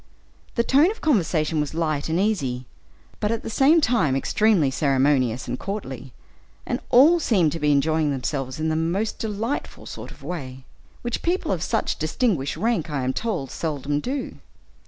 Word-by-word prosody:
The 235 - +2
tone 285 +8 +4
of 440 - -5
conversation 165 - +1
was 150 +1 -4
light 155 -3 -1
and 165 +2 +1
easy, 140 -12 0 0.5
but 210 0 0
at 230 - -2
the - - -5
same 280 +8 +5
time 220 - +2
extremely 175 0 +2
ceremonious 135 -3 +1
and 125 - -3
courtly, 135 - -6 0.5
and - - -2
all 310 +8 +6
seemed 190 - +2
to 165 - -4
be 150 -1 +2
enjoying 155 +2 +2
themselves 135 0 -3
in 160 0 0
the 155 - 0
most 175 +7 -1
delightful 220 +5 -3
sort - - -8
of - - -14
a - - -10
way, 130 -7 -6 0.4
which 240 -1 -2
people 350 - 0
of, 180 -4 -1
such - - -1
distinguished 155 - 0
rank, 220 -8 0
I 140 -3 -2
am 130 +1 0
told, 175 - -3
seldom 145 -2 -2
do. 265 - -4
160 Hz, 175 wpm, -24 LUFS, 140-225 Hz, 0.5 s, all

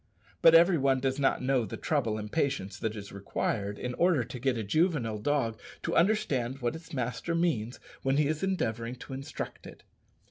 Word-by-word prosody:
But 165 0 +8
every 170 0 +6
one 135 -1 +3
does 135 +1 -1
not 135 -2 +2
know 130 -2 +2
the 105 - -6
trouble 120 -9 0
and 105 0 -6
patience 135 -11 -1
that 110 -1 -2
is 100 -2 -8
required 100 +1 -2
in 125 0 -4
order 170 -3 +3
to 125 +2 -8
get 130 -1 +1
a 110 - -2
juvenile 125 - +1
dog 115 -2 0 0.2
to - - -1
understand 140 - +2
what 120 0 -2
its 165 +1 -11
master 130 +5 -2
means 140 -9 0 0.2
when 135 +1 +1
he 150 - +4
is 155 +1 -1
endeavouring 120 - -1
to 130 - -9
instruct 135 +1 -6
it. - - -13
130 Hz, 190 wpm, -29 LUFS, 115-155 Hz, 0.2 s, But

